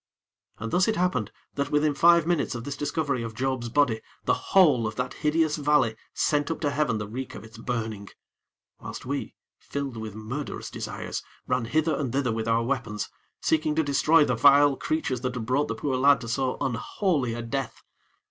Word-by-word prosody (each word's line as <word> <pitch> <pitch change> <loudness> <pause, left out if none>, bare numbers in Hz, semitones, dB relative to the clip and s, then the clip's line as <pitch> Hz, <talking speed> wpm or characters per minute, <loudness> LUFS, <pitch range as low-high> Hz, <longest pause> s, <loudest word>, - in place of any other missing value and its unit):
And 115 +2 -5
thus 185 +1 +3
it 220 - +1
happened 135 - 0 0.2
that 140 0 -2
within 150 0 +2
five 170 +2 +5
minutes 170 -7 0
of 115 - -5
this 140 +2 -4
discovery 145 -3 -1
of 115 -1 -5
Job's 130 -1 -1
body, 120 -4 +2 0.2
the - - +3
whole 145 - +4
of 110 - -5
that 125 +2 -3
hideous 155 0 +1
valley 145 -6 +2 0.2
sent 145 0 +1
up 165 - -2
to 145 -3 +1
heaven 140 -6 +1
the 105 - -3
reek 130 +5 -6
of - - -9
its 110 0 -13
burning; 110 -4 -4 0.7
whilst - - -8
we, - - -4 0.2
filled 140 -4 -5
with 110 -2 -6
murderous 120 +7 -5
desires, - - -5 0.2
ran 125 -2 0
hither 155 +6 +1
and 135 -5 -2
thither 135 -3 +1
with 110 0 -2
our 115 +1 +2
weapons, 115 -5 -2 0.3
seeking 155 -1 +1
to 160 - +2
destroy 150 +2 +4
the 125 - +1
vile 140 +3 +6
creatures 130 -4 -2
that 125 -1 -2
had 115 -3 -3
brought 130 +5 +1
the - - -3
poor 135 -3 -1
lad 140 0 +5
to 115 - -6
so 125 +2 -1
unholy 130 - -1
a 120 - -4
death. 135 +1 -4
135 Hz, 195 wpm, -26 LUFS, 115-150 Hz, 0.7 s, vile